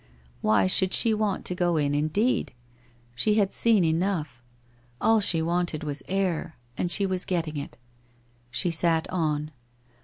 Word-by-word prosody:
Why 105 -3 +3
should 185 - +3
she 230 -2 +4
want 210 -2 -1
to - - -2
go 175 -2 0
in, 145 -1 0
indeed? 155 - 0 0.6
She 210 - +1
had 200 -3 +1
seen 225 -5 +3
enough. 160 -6 -1 0.6
All 225 0 +3
she 170 -5 +2
wanted 170 -2 -1
was 145 -1 -3
air, 185 -5 -2 0.2
and 175 - -2
she 200 +3 +1
was 185 -1 0
getting 165 -4 -2
it. 140 - -7 0.7
She 175 +7 -1
sat 165 0 +2
on 155 -3 -1
170 Hz, 150 wpm, -26 LUFS, 155-195 Hz, 0.7 s, she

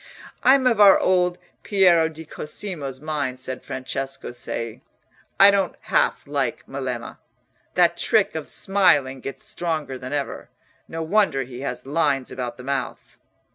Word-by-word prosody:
"I'm 265 0 +5
of 235 -4 +3
our 200 -2 +8
old 180 -1 +2 0.2
Piero 175 -5 +4
di 160 0 -10
Cosimo's 150 -4 -6
mind," 145 -4 -3
said 130 0 -4
Francesco 135 +1 -4
Cei. 115 -2 -6 0.6
"I 200 +1 +9
don't 200 -1 0
half - - +1
like - - -2
Melema. - - -5 0.6
That - - +4
trick - - +2
of - - -5
smiling 145 -10 +2
gets 135 +2 -7
stronger 155 -6 -3
than 130 +1 -7
ever—no 145 +3 -6
wonder 165 -6 +2
he 125 -1 -9
has 125 -2 -5
lines 135 -2 0
about 125 -2 -5
the 125 - -10
mouth." 140 +1 -4
150 Hz, 135 wpm, -23 LUFS, 130-185 Hz, 0.6 s, I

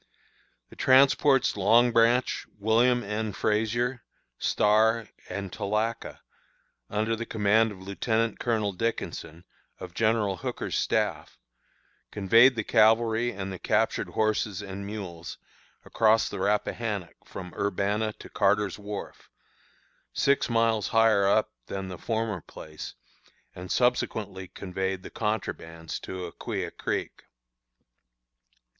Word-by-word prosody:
"The - - -13
transports 135 0 +4
Long 115 +5 +4
Branch, 115 +2 +2
William 120 +4 +3
N. 105 +1 -3
Frazier, 115 +5 0 0.4
Star, 110 +1 +3 0.2
and 95 0 -5
Tallaca, 110 +3 -2 0.7
under 110 +2 0
the 115 - -4
command 110 +1 +2
of 95 -2 -11
Lieutenant 110 +3 -1
Colonel 110 -4 0
Dickinson, 90 -5 -4 0.3
of 90 -2 -8
General 110 -3 +1
Hooker's - - -4
staff, - - -1 0.7
conveyed 115 +6 +5
the 110 - -2
cavalry 115 +2 +3
and 95 -2 -5
the 90 - -7
captured - - 0
horses 110 -2 0
and 100 0 -7
mules 95 -5 -7 0.5
across 110 0 +3
the 100 - -6
Rappahannock 105 -1 -1
from 90 -2 -9
Urbanna 100 +2 -1
to - - -11
Carter's 105 0 +1
wharf, 105 -1 -8 0.8
six 140 -2 +2
miles 115 -2 +2
higher 110 -3 +4
up 110 +2 +2 0.2
than 95 -1 -5
the 90 - -8
former 110 -5 -2
place, 75 0 -10 0.6
and 90 +1 -8
subsequently 105 -6 0
conveyed 95 +1 -4
the - - -9
contrabands 80 -7 -4
to 95 -1 -6
Aquia 85 - -5
Creek. - - -4
105 Hz, 115 wpm, -27 LUFS, 95-115 Hz, 0.8 s, conveyed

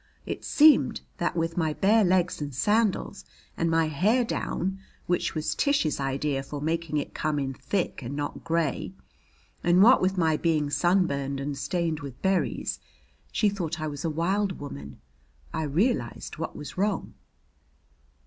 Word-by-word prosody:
It - - -5
seems 305 0 +5 0.2
that - - -1
with 165 +1 -1
my 160 -3 +1
bare 210 +6 +4
legs 180 -3 +2
and 145 -3 -4
sandals 210 - +1 0.3
and 165 - 0
my 165 0 +3
hair 205 - +2
down, 190 -3 -2 0.3
which 175 -1 0
was 155 - -1
Tish's 280 - +1
idea 135 +1 -1
for 145 +2 -6
making 160 +1 -1
it 145 - -3
come 155 -1 -1
in 135 -1 -2
thick 185 +6 -2
and 130 +3 -5
not 145 0 -4
gray, 165 +1 -1 0.7
and 175 +2 +5
what 250 +4 +7
with 190 +1 +1
my 160 -3 +3
being 155 -3 +1
sunburned 140 -7 +1
and 140 +1 -3
stained 155 +3 -1
with 140 -4 -8
berries, 190 -1 0 0.5
she 215 - +2
thought 175 -5 -2
I 155 - -2
was 145 -2 -5
a 165 - 0
wild 185 +5 0
woman. 70 - -8 0.5
I 160 - -1
realized 185 - -1
what - - -4
was - - -7
wrong. 205 +2 -1
165 Hz, 160 wpm, -27 LUFS, 145-190 Hz, 0.7 s, what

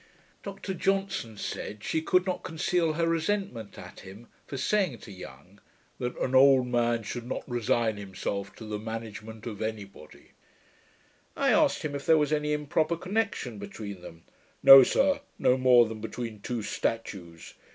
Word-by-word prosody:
Dr 195 -1 -6
Johnson 195 - -1
said, 105 +1 -6
she 160 - -1
could 180 +3 +2
not 185 -1 -2
conceal 165 0 0
her 165 +2 0
resentment 165 - -2
at - - -11
him, 100 +5 -13 0.2
for 140 - -6
saying 185 - 0
to 105 - -11
Young, 90 +1 -12 0.4
that 125 0 -3
'an 130 - -2
old 130 -1 +6
man 120 -2 0
should 120 +3 -6
not - - -5
resign 120 -3 0
himself 100 0 -5
to 110 - -10
the 105 -1 -4
management 110 0 -7
of 110 -4 -6
any 110 -1 -3
body.' 85 -6 -17 1.1
I - - +2
asked - - +3
him, 150 - -3
if 140 0 -6
there 160 -1 +6
was 150 0 +1
any 150 0 0
improper 155 +2 0
connection 185 - -2
between 100 -1 -8
them. 85 -1 -12 0.4
'No, 135 0 +12
sir, 280 - +2 0.2
no 125 - +3
more 125 -2 +6
than 110 -1 -7
between 115 -1 -6
two 120 -1 -4
statues. 90 -8 -4
120 Hz, 160 wpm, -28 LUFS, 105-155 Hz, 1.1 s, No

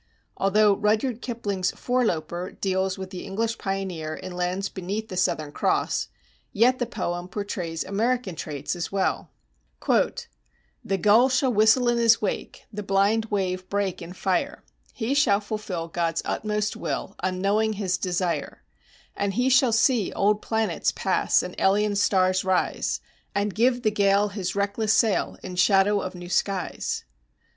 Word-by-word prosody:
Although 205 +1 +3
Rudyard 220 +3 0
Kipling's 205 -6 -2
"Foreloper"[270:1] 180 -8 -2
deals 190 0 0
with 190 -1 -7
the 185 - -6
English 225 +3 -2
pioneer 185 -5 -3
in 185 0 -8
lands 180 +2 -2
beneath 200 +4 -5
the 185 - -6
Southern 155 -4 0
Cross, - - 0 0.4
yet 250 +4 +3
the 245 - -1
poem 175 -5 -3
portrays 180 -4 -4
American 220 +1 -1
traits 150 0 -4
as 175 - -4
well: 195 -1 -1 0.6
"The 60 - -2
gull 220 +8 +5
shall 260 -1 +2
whistle 220 +4 +4
in 240 0 +2
his 230 -1 +5
wake, 210 - -4
the 210 - -4
blind 200 +3 +2
wave 185 -3 -2
break 200 -2 -1
in 175 - -8
fire, 190 +10 -1 0.3
He 235 +2 -2
shall 240 -8 +4
fulfill 205 -5 -4
God's 165 -1 -1
utmost 210 0 -1
will, 195 - -4
unknowing 200 +4 +1
his 190 -3 -1
desire; 180 -1 -2 0.5
And 200 -1 -1
he 250 +3 +2
shall 260 -1 +5
see 225 -2 +2
old 210 +1 +2
planets 220 -1 0
pass - - +1
and - - -6
alien 205 +2 +2
stars 185 -2 +2
arise, 185 -1 0 0.3
And 200 0 0
give 245 +3 +2
the 215 - +3
gale 200 0 +3
his 195 -3 -4
reckless 200 +2 +1
sail 220 -4 +1
in 185 -1 -7
shadow 195 +2 +4
of 185 0 -5
new 175 0 -8
skies. 185 0 -1
200 Hz, 150 wpm, -25 LUFS, 185-220 Hz, 0.6 s, gull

